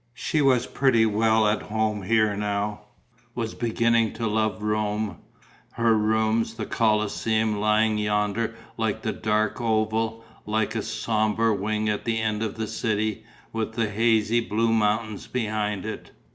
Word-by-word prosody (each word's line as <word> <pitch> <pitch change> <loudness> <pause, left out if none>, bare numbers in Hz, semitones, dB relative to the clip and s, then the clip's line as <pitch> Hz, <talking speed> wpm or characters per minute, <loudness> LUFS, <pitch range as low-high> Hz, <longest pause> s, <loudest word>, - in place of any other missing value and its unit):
She 155 - 0
was 130 -3 +3
pretty 125 -4 +3
well 110 +1 +3
at 105 +1 +1
home 110 -1 -1
here 110 +1 +2
now, 105 0 -2 0.5
was 115 -2 -3
beginning 115 -1 +1
to 115 - -4
love 110 -2 0
Rome, 105 0 -1 0.5
her 115 -1 +3
rooms, 110 +1 +1
the 110 -2 -4
Colosseum 110 0 +1
lying 105 +1 +2
yonder 105 +2 0 0.2
like 110 -1 -2
a 110 - +1
dark 110 +1 0
oval, 110 0 0 0.2
like 110 0 0
a - - -1
sombre 110 0 0
wing 105 +2 -1
at 105 -1 -1
the 115 -1 0
end 110 -1 -1
of 110 -2 -2
the 110 0 -3
city, 110 0 -2 0.3
with 110 -1 -2
the 110 -2 -1
hazy 115 +1 +2
blue 115 0 0
mountains 110 -1 0
behind 105 -5 -2
it. - - -6
110 Hz, 145 wpm, -25 LUFS, 105-115 Hz, 0.5 s, was